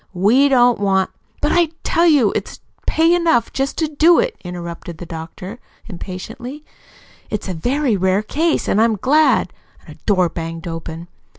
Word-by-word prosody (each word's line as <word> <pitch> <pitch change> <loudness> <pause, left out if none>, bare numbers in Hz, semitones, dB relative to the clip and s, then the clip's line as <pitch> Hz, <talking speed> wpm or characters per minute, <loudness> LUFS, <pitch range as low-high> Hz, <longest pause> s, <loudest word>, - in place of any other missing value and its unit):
We 235 +10 +4
don't 245 -3 +4
want 190 -2 +1
" - - -37
"But - - +2
I 345 -2 +3
tell 340 +1 +2
you 280 -10 +4
it's - - -4 0.3
pay 325 +2 +3
enough 335 -9 +2
just 270 +1 -2
to 320 - 0
do 315 +3 +4
it," - - +1
interrupted 170 -2 -7
the 175 - -8
doctor 170 +6 -8 0.3
impatiently. 225 - -8 0.6
"It's 210 -1 -4
a 185 - -3
very 245 - 0
rare 190 +2 +1
case, 315 +8 0
and 210 - +2
I'm 225 -1 +3
glad 265 - +2 0.2
" - - -27
A 155 - -10
door 185 -3 +3
banged 165 0 -6
open. 165 0 -6
215 Hz, 170 wpm, -19 LUFS, 180-290 Hz, 0.6 s, We